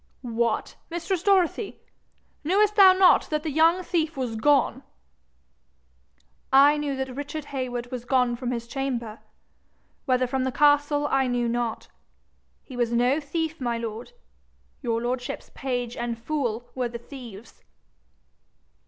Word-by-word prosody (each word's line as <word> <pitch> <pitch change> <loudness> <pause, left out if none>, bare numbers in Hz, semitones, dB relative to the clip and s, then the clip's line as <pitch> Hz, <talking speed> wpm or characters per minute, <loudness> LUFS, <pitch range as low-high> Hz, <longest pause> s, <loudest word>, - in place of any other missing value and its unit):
'What, 235 -2 -1
mistress 345 +1 -2
Dorothy! 390 +1 +1 0.6
knewest 405 +6 +2
thou 390 -3 +9
not 370 -1 +5
that 305 -1 -1
the 315 - -2
young 330 +5 +3
thief 320 -4 -1
was 250 -4 -2
gone?' 270 +1 +2 1.7
'I 280 +2 +6
knew 290 -2 -2
that 265 -1 -4
Richard 290 +2 -5
Heywood 245 -2 -4
was 250 -2 -5
gone 250 -1 +2
from 245 0 -4
his 235 -2 -3
chamber 235 -4 -4 0.9
whether 255 -1 +2
from 255 +1 -1
the 260 - -1
castle 290 +1 +3
I 270 -2 +1
knew 245 -1 0
not. 235 -1 -2 0.8
He 260 - -11
was 240 -1 0
no 245 +5 +2
thief, 320 +1 -3
my 240 -2 -1
lord. 230 - -6 0.7
Your 230 -3 -1
lordship's 250 +2 -4
page 245 -2 -3
and 235 -1 -3
fool 240 -2 -3
were 250 -2 -2
the 235 - -6
thieves.' 235 -4 -12
260 Hz, 135 wpm, -25 LUFS, 240-295 Hz, 1.7 s, thou